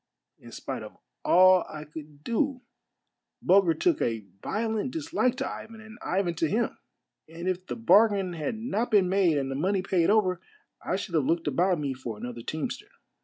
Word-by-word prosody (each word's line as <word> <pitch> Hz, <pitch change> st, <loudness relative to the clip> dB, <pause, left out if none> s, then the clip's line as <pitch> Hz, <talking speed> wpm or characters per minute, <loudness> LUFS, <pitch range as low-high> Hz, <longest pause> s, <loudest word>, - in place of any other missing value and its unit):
In -, -, -13 dB
spite -, -, -5 dB
of -, -, -10 dB, 0.3 s
all 185 Hz, 0 st, +6 dB
I 150 Hz, -, -7 dB
could 150 Hz, -1 st, -11 dB
do 255 Hz, -, 0 dB, 0.8 s
Bulger 185 Hz, -3 st, +4 dB
took 350 Hz, -4 st, +1 dB
a 115 Hz, -3 st, -1 dB, 0.2 s
violent 220 Hz, +2 st, -1 dB
dislike 285 Hz, -4 st, 0 dB
to 270 Hz, 0 st, -2 dB
Ivan 225 Hz, 0 st, -8 dB
and 220 Hz, +2 st, -13 dB
Ivan 180 Hz, -2 st, 0 dB
to 160 Hz, -, +1 dB
him; 235 Hz, +7 st, 0 dB, 0.5 s
and 170 Hz, +2 st, -7 dB
if 185 Hz, 0 st, -2 dB
the -, -, -3 dB
bargain 205 Hz, -5 st, +4 dB
had 160 Hz, +5 st, -3 dB
not 230 Hz, +1 st, -2 dB
been 205 Hz, -5 st, +4 dB
made 185 Hz, -5 st, +3 dB
and 135 Hz, -1 st, -1 dB
the -, -, -3 dB
money 185 Hz, +6 st, 0 dB
paid 180 Hz, -3 st, +2 dB
over, 185 Hz, -4 st, +2 dB, 0.4 s
I -, -, -1 dB
should -, -, -5 dB
have -, -, +2 dB
looked 330 Hz, +3 st, +1 dB
about 180 Hz, -, +2 dB
me 145 Hz, -3 st, -2 dB
for 125 Hz, -4 st, -6 dB
another 120 Hz, +1 st, -6 dB
teamster. 155 Hz, +6 st, -4 dB
185 Hz, 180 wpm, -27 LUFS, 160-225 Hz, 0.8 s, all